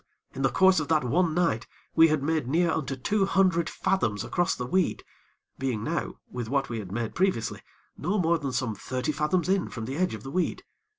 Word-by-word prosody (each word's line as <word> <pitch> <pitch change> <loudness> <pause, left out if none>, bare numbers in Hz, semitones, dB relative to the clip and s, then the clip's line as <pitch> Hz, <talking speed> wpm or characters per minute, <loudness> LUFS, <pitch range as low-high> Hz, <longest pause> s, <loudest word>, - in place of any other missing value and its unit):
in - - -5
the 135 - +3
course 190 -1 +5
of 155 - -3
that 155 -3 +2
one 160 +6 +1
night, 165 -10 +1 0.3
we 165 0 +8
had 155 -3 0
made 155 -3 0
near 165 +4 +2
unto 140 -4 -2
two 195 +9 +1
hundred 185 -4 +2
fathoms 110 - 0
across 175 -1 0
the 125 - -4
weed, 185 +7 0 0.6
being 125 -5 -1
now, - - -2
with 120 -3 -5
what 135 0 0
we 115 -2 -3
had 95 -4 -7
made 115 +1 -3
previously, 185 - 0 0.3
no 185 +7 -1
more 170 -3 +2
than 140 -2 -3
some 125 -3 -1
thirty 130 +6 -3
fathoms 150 +5 0
in 190 -1 +1
from 115 -2 -6
the 130 +4 -4
edge 180 -9 +1
of 105 - -10
the 135 - -7
weed. 180 +3 -1
150 Hz, 215 wpm, -27 LUFS, 125-175 Hz, 0.6 s, we